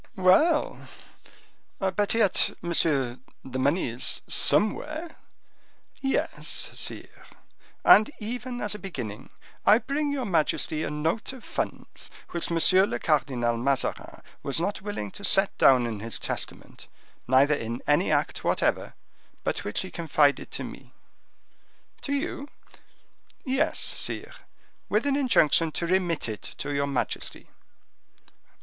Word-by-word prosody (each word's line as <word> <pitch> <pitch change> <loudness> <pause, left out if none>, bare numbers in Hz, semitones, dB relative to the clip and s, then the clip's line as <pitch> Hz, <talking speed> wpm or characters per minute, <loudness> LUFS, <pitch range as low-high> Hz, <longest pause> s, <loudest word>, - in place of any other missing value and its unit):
"Well, 200 - +3 0.9
but 195 +3 0
yet, 215 -5 +2
monsieur, 145 -7 +1 0.3
the 130 0 -5
money 145 +7 +1
is 115 +2 +1
somewhere?" 310 +10 +2 0.8
"Yes, 270 0 0
sire, - - -6 0.6
and 215 - +7
even 245 +3 -5
as 210 - -1
a 210 - -7
beginning, 125 - -7 0.3
I 210 - +6
bring 285 +4 -2
your 275 -3 -2
majesty 160 -3 0
a - - -2
note 160 +12 -2
of 260 - -12
funds - - -5 0.2
which 170 - -3
M. 170 - 0 0.3
le - - -2
Cardinal 125 -6 0
Mazarin 135 +3 -2 0.2
was 140 +2 -1
not 195 +4 -2
willing 195 - -5
to 200 - -12
set 195 0 +3
down 125 -2 +6
in 110 -3 -4
his 115 +1 -4
testament, - - -5 0.4
neither 135 +4 +4
in 115 -4 -4
any - - +2
act - - 0
whatever, - - 0 0.5
but - - -2
which 105 - -2
he 185 - -7
confided 150 -3 +1
to - - -4
me." - - -10 1.1
"To 280 - -3
you?" 280 0 -3 1.0
"Yes, 270 +4 0
sire, - - -1 0.6
with 210 +6 +1
an 280 -1 +1
injunction 165 - +3
to 170 - -2
remit 175 -4 0
it 110 -2 -5 0.2
to 145 - -4
your 140 0 0
majesty." 140 -2 -3
170 Hz, 130 wpm, -26 LUFS, 140-220 Hz, 1.1 s, and